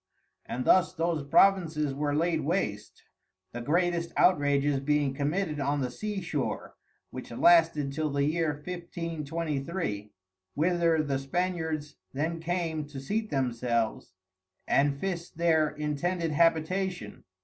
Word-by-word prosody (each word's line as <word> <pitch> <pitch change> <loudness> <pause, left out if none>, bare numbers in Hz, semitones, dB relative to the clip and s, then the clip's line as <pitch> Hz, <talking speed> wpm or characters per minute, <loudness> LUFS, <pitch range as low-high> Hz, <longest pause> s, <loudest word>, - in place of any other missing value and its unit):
And 125 - -3
thus 185 -1 +4
those 165 -3 -1
Provinces 155 -2 +3
were 145 +1 -1
laid 165 0 +1
waste, 140 - -2 0.5
the 120 - -6
greatest 170 +4 0
Outrages 145 -4 +3
being 145 -1 +1
committed 150 +3 -1
on 140 +1 0
the 125 -1 -2
Sea 210 +7 -4
shore, 155 -6 -3 0.4
which 130 - -8
lasted 160 +1 +4
till 155 +1 -1
the 140 0 0
Year 160 +2 +1 0.2
1523, 165 - -4 0.4
whither 165 0 +2
the 140 -2 -1
Spaniards 160 0 -2 0.2
then 160 +4 -2
came 165 -3 -2
to 145 -2 -8
seat 215 +11 -2
themselves, 120 -6 -1 0.5
and 140 0 +2
fis 175 -2 -3
their 160 -2 +2
intended 160 +3 -2
Habitation. 165 - 0
155 Hz, 120 wpm, -28 LUFS, 140-170 Hz, 0.5 s, thus